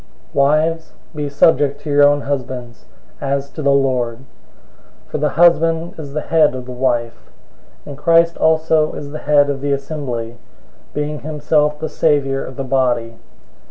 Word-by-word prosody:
005:022 - - -32
Wives, 155 +3 +1 0.2
be 150 -2 -4
subject 140 -1 +2
to 150 - -5
your 145 0 +5
own 145 0 +4
husbands, 130 -4 -5 0.4
as 140 0 -2
to 155 - -7
the 140 - +1
Lord. 130 -4 +1
005:023 130 - -18 0.9
For - - -2
the 150 +1 +1
husband 165 0 +3
is 145 -3 -8
the 155 - -2
head 155 -4 +2
of 125 -1 -6
the 125 - -8
wife, 120 -2 -2 0.6
and 145 - -8
Christ 165 +3 +3
also 160 -1 +2
is 145 -1 -7
the 155 - -6
head 145 -1 +3
of 135 -1 -5
the 145 0 -1
assembly, 130 -5 -5 0.6
being 150 0 -3
himself 150 0 0
the 155 - -4
savior 140 -3 0
of 130 - -9
the 135 - -3
body. 125 -3 0
145 Hz, 165 wpm, -18 LUFS, 135-155 Hz, 0.9 s, your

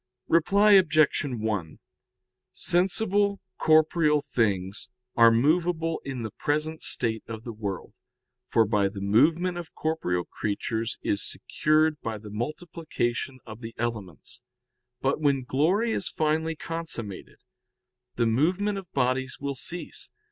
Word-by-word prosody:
Reply 200 +6 +4
Obj. 155 -6 +5
1: 110 - -3 0.7
Sensible 200 +2 +1 0.2
corporeal 155 -1 +4
things 105 -8 -1 0.3
are 115 -1 +7
movable 165 +6 +1
in 130 -4 -5
the 110 - -5
present 155 +5 -2
state 110 -2 0
of 115 -1 -7
the 115 - -6
world, 105 -1 -5 0.5
for 115 -1 +3
by 100 -2 +1
the 100 0 -8
movement 160 - +2
of 170 - -10
corporeal 90 - -1
creatures 110 +2 -3
is 100 - 0
secured 155 -1 +1
by 110 -1 -3
the 105 0 -11
multiplication 135 0 -3
of 110 +1 -10
the 115 -1 -8
elements. 110 -9 -5 0.6
But - - 0
when 140 -3 +2
glory 175 - +1
is 185 - -1
finally 160 +1 0
consummated, 155 - -5 0.8
the 120 - +1
movement 180 - +1
of 185 -3 -13
bodies 130 0 0
will 140 0 -3
cease. 175 +6 -6
140 Hz, 125 wpm, -26 LUFS, 110-165 Hz, 0.8 s, are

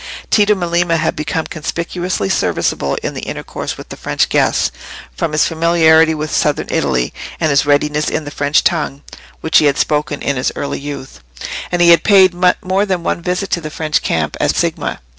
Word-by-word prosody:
Tito 210 -1 +4
Melema 175 -2 0
had - - -1
become 160 +1 -2
conspicuously 170 - -3
serviceable 70 -6 0
in - - -3
the - - -6
intercourse - - -6
with - - -11
the - - -7
French - - -1
guests, - - +1 0.4
from 170 - -2
his 155 +1 +2
familiarity 160 -1 +4
with 155 0 -4
Southern 150 -1 +1
Italy, 60 -4 0 0.3
and 155 - +1
his 140 +1 +2
readiness 150 +1 +1
in 160 - -2
the 145 - -7
French 145 +1 +1
tongue, 150 -4 -1 0.4
which 160 - +4
he - - +2
had 140 -1 +2
spoken 150 -1 0
in 140 - -1
his 125 - 0
early 140 - -3
youth; 140 -2 -8 0.5
and 175 -1 +2
he 170 - +6
had 170 - +6
paid 190 -3 +5 0.3
more 190 +2 +1
than 185 -3 -1
one 170 - -1
visit 180 +2 -2
to 170 - 0
the 155 - -6
French 155 0 -1
camp 80 -2 -1
at - - +1
Signa. - - -2
160 Hz, 190 wpm, -16 LUFS, 145-175 Hz, 0.5 s, he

